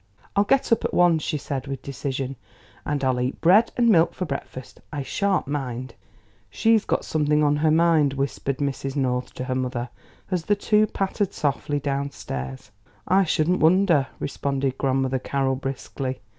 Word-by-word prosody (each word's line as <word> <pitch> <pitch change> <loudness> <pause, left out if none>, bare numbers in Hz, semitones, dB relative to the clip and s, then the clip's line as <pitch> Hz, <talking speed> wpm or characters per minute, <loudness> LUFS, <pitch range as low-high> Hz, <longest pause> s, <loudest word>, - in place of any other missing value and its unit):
"I'll 200 +1 +3
get 270 +3 +2
up 230 - +3
at - - -2
once," 175 -3 +4
she 150 - -2
said 140 -1 -4
with 135 -1 -5
decision, 135 0 -4 0.5
"and 145 -2 -1
I'll 130 -1 +1
eat 125 +2 -2
bread 195 +7 +5
and 240 -1 +3
milk 170 -6 +4
for 185 - -3
breakfast; 135 -3 -7
I 145 -2 -3
sha'n't 200 +5 0
mind." 130 -4 -4 0.6
"She's 225 - +2
got - - -1
something 150 -1 +1
on 145 0 +3
her 155 +1 +2
mind," 160 -3 +4
whispered 140 0 -2
Mrs. 135 -1 -3
North 125 -3 -1
to - - -4
her 130 0 -2
mother, 125 -1 -2 0.4
as 175 -3 -1
the 205 - +3
two 210 +1 +3
pattered 195 0 -2
softly 145 0 -1
downstairs. 110 - -4 0.4
"I 190 +1 +4
shouldn't 165 +2 +1
wonder," 165 -4 +4
responded 135 -1 -2
Grandmother 135 -1 +1
Carroll 135 0 0
briskly. 135 0 -5
140 Hz, 165 wpm, -24 LUFS, 130-170 Hz, 0.6 s, bread